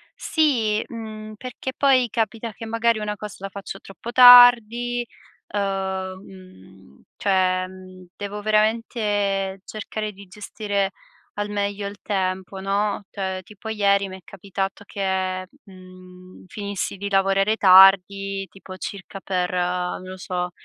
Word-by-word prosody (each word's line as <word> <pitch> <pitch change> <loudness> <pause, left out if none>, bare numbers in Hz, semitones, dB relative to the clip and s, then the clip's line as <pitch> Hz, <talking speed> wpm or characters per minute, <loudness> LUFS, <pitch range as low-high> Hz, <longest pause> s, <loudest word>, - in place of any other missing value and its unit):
Sì, 235 -10 +1
mhmm, 215 -2 -8
perché 255 +3 -6
poi 260 -3 +3
capita 225 0 -2
che, 225 - -9
magari, 230 0 +1
una 210 0 -3
cosa 210 0 -9
la 195 - -5
faccio 195 0 -8
troppo 210 +4 -9
tardi, 245 -1 +7 0.5
uhm, 190 -2 -2
mhmm, 95 - -16
cioè, 185 -2 +1
ehm, 185 -1 -13
devo 205 0 -5
veramente 210 -3 0
cercare 215 0 -5
di 200 0 -14
gestire 200 0 -3 0.4
al 205 0 -3
meglio 200 0 -2
il 200 - -8
tempo, 190 -1 -2
no, 200 +2 -1
cioè 190 -1 -3
tipo 210 +3 -10
ieri 200 -2 +2
mi 190 - -8
è - - -14
capitato 195 0 -5
che, 190 -2 -2 0.2
mhmm, 185 -1 -15
finissi 200 0 -4
di 200 +1 -4
lavorare 195 +2 +2
tardi, 195 0 +5
tipo, 190 -1 -11
circa 195 0 -7
per, 180 -2 -1
non 180 0 -1
lo 185 0 -8
so, 180 -1 -3
200 Hz, 130 wpm, -23 LUFS, 185-215 Hz, 0.5 s, tardi